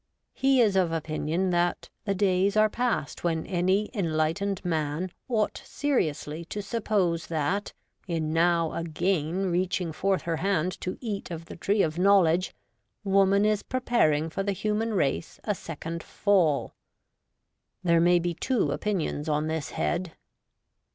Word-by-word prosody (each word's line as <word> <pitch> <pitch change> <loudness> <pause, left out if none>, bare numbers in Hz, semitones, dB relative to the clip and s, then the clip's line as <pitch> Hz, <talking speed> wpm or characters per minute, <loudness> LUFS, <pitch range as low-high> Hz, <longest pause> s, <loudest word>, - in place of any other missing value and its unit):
He 270 -1 +3
is 210 -4 +3
of 180 -3 +3
opinion 165 +3 -1
that 175 0 0
' - - -49
the 200 -2 0
days 195 +1 +2
are 215 0 +4
past 240 - -2
when 165 -2 0
any 190 +3 +1
enlightened 180 +1 -1
man 160 +1 -1 0.2
ought 220 -3 0
seriously 160 - -1
to 205 +4 -5
suppose 195 -6 0
that, 165 +6 -1 0.3
in 160 -3 -1
now 165 -1 +2
again 170 +2 -1
reaching 180 -1 0
forth 190 +1 0
her 165 -1 -1
hand 185 0 -1
to 185 - -3
eat 210 -5 -4
of 165 -1 -6
the - - -9
tree 200 +3 +1
of 155 +1 -2
knowledge, 185 -2 +4 0.5
woman 195 0 +4
is 215 -1 +2
preparing 235 -12 +1
for 195 - -2
the 200 0 0
human 215 +3 -1
race 145 -2 -1
a 210 - 0
second 165 -2 -6
Fall.' 175 -9 +1 1.1
There 170 -2 +4
may 175 +1 +5
be 175 0 -1
two 240 +8 0
opinions 170 -7 -2
on 150 0 +1
this 160 -2 -2
head. 175 -1 -2
180 Hz, 145 wpm, -27 LUFS, 165-200 Hz, 1.1 s, may